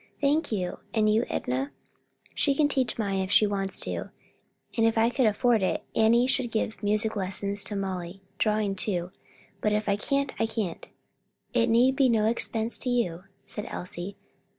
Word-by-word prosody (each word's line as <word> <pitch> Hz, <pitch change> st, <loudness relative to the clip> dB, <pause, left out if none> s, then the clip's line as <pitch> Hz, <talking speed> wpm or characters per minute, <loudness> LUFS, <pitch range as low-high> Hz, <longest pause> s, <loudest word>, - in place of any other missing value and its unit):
"Thank 290 Hz, +1 st, +1 dB
you. 185 Hz, -4 st, -2 dB, 0.2 s
And 215 Hz, -1 st, +3 dB
you, 225 Hz, +3 st, +2 dB
Enna?" 130 Hz, +3 st, -2 dB, 0.6 s
"She 280 Hz, -2 st, +1 dB
can 295 Hz, 0 st, +3 dB
teach 265 Hz, -3 st, 0 dB
mine 200 Hz, -3 st, -1 dB
if 190 Hz, 0 st, -2 dB
she 210 Hz, -, +5 dB
wants 195 Hz, -1 st, 0 dB
to, -, -, -3 dB, 0.7 s
and 225 Hz, -1 st, +3 dB
if 225 Hz, -, 0 dB
I 225 Hz, +2 st, +4 dB
could 250 Hz, -2 st, +2 dB
afford 230 Hz, +1 st, +2 dB
it, 185 Hz, -, 0 dB
Annie 230 Hz, +2 st, +4 dB
should 255 Hz, -1 st, +1 dB
give 220 Hz, -1 st, -2 dB
music 215 Hz, +1 st, +1 dB
lessons 200 Hz, +1 st, 0 dB
to 210 Hz, -, -4 dB
Molly; 190 Hz, -1 st, -4 dB, 0.2 s
drawing 210 Hz, -2 st, +1 dB
too; 185 Hz, -2 st, -2 dB, 0.5 s
but 210 Hz, -, +1 dB
if 210 Hz, 0 st, 0 dB
I 200 Hz, 0 st, +2 dB
can't, 275 Hz, +5 st, -1 dB
I 225 Hz, -, +2 dB
can't." 210 Hz, -6 st, -4 dB, 0.7 s
"It 235 Hz, -1 st, +2 dB
need 245 Hz, +4 st, +4 dB
be 270 Hz, -2 st, +4 dB
no 220 Hz, -2 st, +3 dB
expense 225 Hz, 0 st, +1 dB
to 255 Hz, -, -3 dB
you," 190 Hz, -8 st, -1 dB, 0.2 s
said 210 Hz, -, -5 dB
Elsie. 180 Hz, +2 st, -6 dB
215 Hz, 175 wpm, -27 LUFS, 195-235 Hz, 0.7 s, she